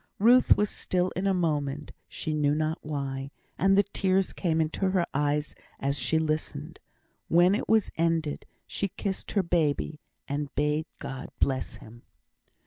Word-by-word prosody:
Ruth 245 +5 +6
was 210 -1 +1
still 180 0 -1
in 190 +2 0
a 195 - +3
moment, 150 -4 -1 0.2
she 155 - -4
knew 150 -1 +2
not 155 +1 -1
why; 140 -2 -4 0.3
and 195 +1 +4
the 200 - +6
tears 190 -1 0
came 165 -3 0
into 160 +5 0
her 185 -2 +2
eyes 145 +1 0 0.3
as 140 +1 -1
she 160 - +2
listened. 155 -1 -2 0.5
When 175 +3 +5
it 205 - -2
was 220 -2 +3
ended, 165 -2 0 0.2
she 200 - -2
kissed 195 0 -4
her 200 - +2
baby, 155 -3 0 0.3
and 145 0 -2
bade 150 +2 +1
God 135 -1 -6
bless 130 -2 0
him. 115 +2 -13
155 Hz, 155 wpm, -28 LUFS, 145-185 Hz, 0.5 s, Ruth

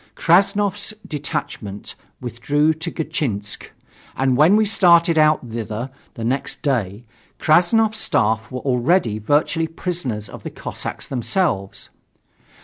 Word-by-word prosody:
Krassnov's 200 +4 +2
detachment 135 - -5 0.3
withdrew 145 +6 +1
to 165 +2 -5
Gatchinsk, 110 - -3 0.5
and 130 -1 +1
when 155 +9 +5
we 215 0 +4
started 170 -5 +4
out 155 -4 +3
thither 115 +2 -5 0.2
the 115 - -6
next 130 +5 -2
day, 115 -6 -1 0.3
Krassnov's 215 +7 +3
staff 110 - +1
were 130 -1 -4
already 125 - +1
virtually 150 +7 +1
prisoners 160 - -3
of - - -10
the - - -6
Cossacks - - -6
themselves. 125 - -2
145 Hz, 115 wpm, -21 LUFS, 115-175 Hz, 0.5 s, when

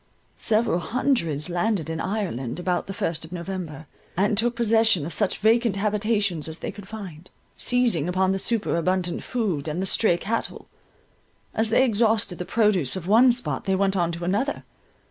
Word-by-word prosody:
Several 215 -5 +1
hundreds 175 - 0
landed 180 0 -1
in 160 0 -3
Ireland, 180 - -3
about 180 0 -1
the 195 - -5
first 165 -1 -2
of 160 - -8
November, 170 -4 -6 0.3
and 205 +3 +2
took 235 +3 +2
possession 225 -7 +3
of 165 - -5
such 205 -3 0
vacant 225 -1 +3
habitations 205 -5 0
as 160 0 -5
they - - -5
could 205 -2 -12
find; 185 -6 -9 0.3
seizing 235 - +1
upon 185 +1 +2
the 195 - -1
superabundant 185 -5 0
food, 195 - -2
and 155 +3 -2
the 190 - -1
stray 190 -2 +3
cattle. 225 +5 -3 0.9
As 220 0 0
they 240 +4 +4
exhausted 220 -5 +1
the 180 - -3
produce 200 - +1
of 185 -3 -5
one 230 +6 +6
spot, 245 +1 -3
they 190 - +1
went 195 0 +1
on 170 -2 +1
to 170 +1 -6
another. 205 +11 -1
195 Hz, 170 wpm, -24 LUFS, 175-220 Hz, 0.9 s, one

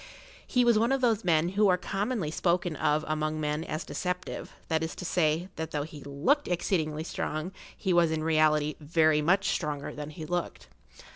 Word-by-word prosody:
He 250 -1 +3
was 235 -3 +5
one 230 +3 +2
of 270 -1 +1
those 230 -3 +2
men 170 -1 +3
who 205 +3 +3
are 180 -1 +4
commonly 195 -2 -2
spoken 175 0 0
of 150 +1 +1
among 155 0 -1
men 150 +1 -1
as 155 0 -4
deceptive; 180 0 -4 0.2
that 160 -1 +1
is 160 0 -3
to 180 - -7
say, 170 +1 +1
that 160 0 -3
though 150 -2 -2
he 150 -1 -10
looked 165 - +1
exceedingly 160 -4 -1
strong 155 +1 -3 0.3
he 190 -3 0
was 170 -1 +4
in 160 -1 -1
reality 155 -1 +3
very 155 0 +3
much 190 +6 +2
stronger 150 -4 -3
than 150 0 -6
he 155 0 -8
looked. 175 0 -4
160 Hz, 190 wpm, -29 LUFS, 155-185 Hz, 0.3 s, was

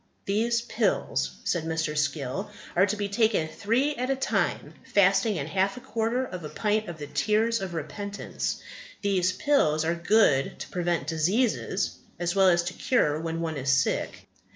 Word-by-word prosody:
"These 230 +4 +1
pills," - - 0
said 175 -3 0
Mr. 160 -1 -2
Skill, 150 +5 -1 0.3
"are 185 +3 +5
to 210 - -1
be 205 0 -1
taken 205 -5 +2
three 235 - 0
at 255 +2 -2
a 270 - +2
time 265 - -1
fasting 195 +2 +3
in 145 -5 -2
half 190 - 0
a - - -5
quarter 240 0 -1
of 180 -8 -7
a 150 - -5
pint 215 +1 0
of 170 - -7
the 150 - -6
tears 220 +7 +1
of 185 -3 -4
repentance; 200 +7 -4 0.4
these 185 -2 +2
pills 175 - +2
are 165 - +2
good 170 -6 +3
to - - -7
prevent 175 -4 -1
diseases, 180 - 0 0.2
as 175 0 -1
well 195 -1 +5
as 175 -1 +3
to 180 +1 -4
cure 155 - +1
when 165 0 -3
one 160 -2 -2
is 135 0 -2
sick. 135 -1 0
190 Hz, 175 wpm, -27 LUFS, 160-220 Hz, 0.4 s, are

